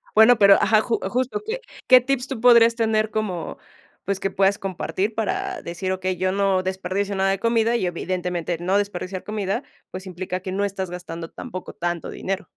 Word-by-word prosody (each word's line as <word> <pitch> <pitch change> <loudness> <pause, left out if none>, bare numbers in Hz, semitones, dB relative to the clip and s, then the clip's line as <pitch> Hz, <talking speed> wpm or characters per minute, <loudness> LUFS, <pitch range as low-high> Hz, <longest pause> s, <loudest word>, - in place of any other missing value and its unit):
Bueno, 220 +2 +7
pero, 200 -1 +8
ajá, 215 -1 +4
ju 230 +1 -1
justo, 255 - -1
¿qué 470 +3 -3 0.3
qué 255 -1 +8
tips 260 0 -1
tú 260 -4 -5
podrías 235 -1 +6
tener 220 -2 +1
como, 190 -7 -3 0.5
pues, 195 0 -1
que 195 0 -2
puedas 195 +1 +2
compartir 195 +2 -2
para 385 - -2
decir: 180 +2 -4
"Okey, 185 0 -1
yo 185 +1 0
no 195 -1 +1
desperdicio 190 +2 -2
nada 195 0 +2
de 195 - -1
comida" 230 +1 +2
Y, 235 - 0
evidentemente, 175 -1 -2
no 185 +3 +1
desperdiciar 190 -2 -3
comida, 210 +3 -2 0.3
pues, 185 +1 -7
implica 185 0 -4
que 185 - -5
no 195 +2 -1
estás 190 -2 -4
gastando 170 -2 -7
tampoco 185 0 -8
tanto 175 -1 -3
dinero. 195 +1 -3
195 Hz, 185 wpm, -23 LUFS, 185-225 Hz, 0.5 s, pero